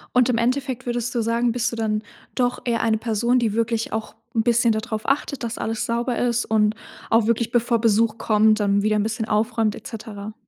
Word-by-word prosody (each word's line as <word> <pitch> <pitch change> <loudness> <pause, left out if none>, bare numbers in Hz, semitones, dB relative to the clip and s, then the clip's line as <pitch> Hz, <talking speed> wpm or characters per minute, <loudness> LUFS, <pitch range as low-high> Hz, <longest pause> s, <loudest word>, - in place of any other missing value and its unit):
Und 250 -1 +5
im 250 - +2
Endeffekt 255 +2 -1
würdest 240 0 -2
du 235 - +1
sagen, 235 +1 +1
bist 240 0 -1
du - - -4
dann 215 -1 -1 0.3
doch 250 -1 0
eher 235 -2 0
eine 220 -1 +2
Person, 235 +2 +1
die 225 -4 0
wirklich 230 0 -1
auch 220 0 -4 0.2
'n 225 - +2
bisschen 235 0 +3
da 220 - -1
drauf 220 -2 -5
achtet, 275 0 0
dass 235 -1 -4
alles 225 0 -2
sauber 235 +1 -1
ist 240 -1 +1
und 215 -1 +2 0.4
auch 225 -1 +4
wirklich 230 0 +1
bevor 235 -1 +1
Besuch 225 0 +2
kommt, 215 0 +3
dann 200 -1 +2
wieder 215 0 +2
'n 210 - +2
bisschen 220 +1 -2
aufräumt 220 0 +1
et - - -11
cetera? 215 -2 -7
230 Hz, 220 wpm, -22 LUFS, 220-240 Hz, 0.4 s, Und